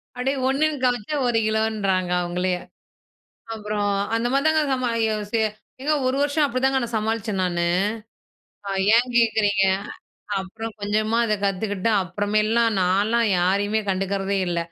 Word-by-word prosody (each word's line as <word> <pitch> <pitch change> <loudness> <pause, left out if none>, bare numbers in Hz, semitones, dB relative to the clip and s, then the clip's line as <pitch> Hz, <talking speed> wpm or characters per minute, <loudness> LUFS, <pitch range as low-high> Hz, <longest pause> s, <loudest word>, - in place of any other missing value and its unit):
அப்படியே 265 +3 -1
1னு 300 +3 +1
காமிச்சா 245 +3 0
1 235 -1 +1
கிலோன்றாங்க 210 -5 0
அவங்களே. 180 +1 -1 1.0
அப்புறம் 210 -1 -2 0.3
அந்த 230 +1 0
மாதிரி 275 +2 +1
தாங்க 315 0 +3
சமா 255 -2 -1 0.9
ஏங்க 305 +2 +1
1 260 - 0
வருஷம் 290 +1 +2
அப்படிதாங்க 265 +1 +1
நான் 230 -1 -4
சமாளிச்சேன் 215 -2 -2
நானு. 175 -1 0 1.3
ஏன் 245 +2 +3
கேட்குறீங்க? 215 -4 +3 0.8
அப்புறம் 225 +4 -7
கொஞ்சமா 215 +2 0
அத 215 -2 +1
கத்துக்கிட்டு 200 +2 -1
அப்புறமேலாம் 215 +4 +1
நான்லாம் 205 +6 +2
யாரையுமே 200 +4 +1
கண்டுக்கிறதே 195 +1 -1
இல்ல. 170 -1 -1
215 Hz, 120 wpm, -23 LUFS, 195-240 Hz, 1.3 s, தாங்க